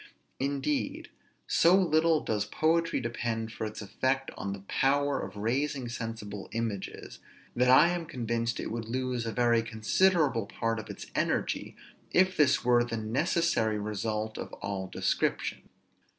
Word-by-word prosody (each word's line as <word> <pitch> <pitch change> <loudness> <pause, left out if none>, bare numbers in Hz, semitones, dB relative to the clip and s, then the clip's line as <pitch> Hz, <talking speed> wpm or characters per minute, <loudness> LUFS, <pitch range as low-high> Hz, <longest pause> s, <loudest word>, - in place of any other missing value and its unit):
Indeed, 285 - -2 0.3
so 170 +2 +5
little 165 -3 +3
does 105 -1 -1
poetry 165 +8 +1
depend 115 -2 -3
for 110 - -3
its 110 0 -7
effect 130 +6 -1
on 100 - -4
the 100 0 -6
power 140 +7 +1
of - - -7
raising 130 +5 -1
sensible 110 -4 -6
images, 110 -4 -4 0.4
that 125 +1 +3
I 145 +6 +7
am 175 -2 -2
convinced 115 -5 -2
it - - -4
would 115 -1 -4
lose 125 -1 -2
a - - -1
very 120 -1 +3
considerable 115 - +2
part 115 0 -2
of 110 - -9
its - - -7
energy, - - -1 0.4
if 185 +1 +4
this 140 -4 +3
were 120 -1 +5
the 120 -1 -3
necessary 115 - +1
result 110 +1 -3
of - - -6
all 100 -1 -4
description. - - -1
120 Hz, 145 wpm, -29 LUFS, 110-150 Hz, 0.4 s, I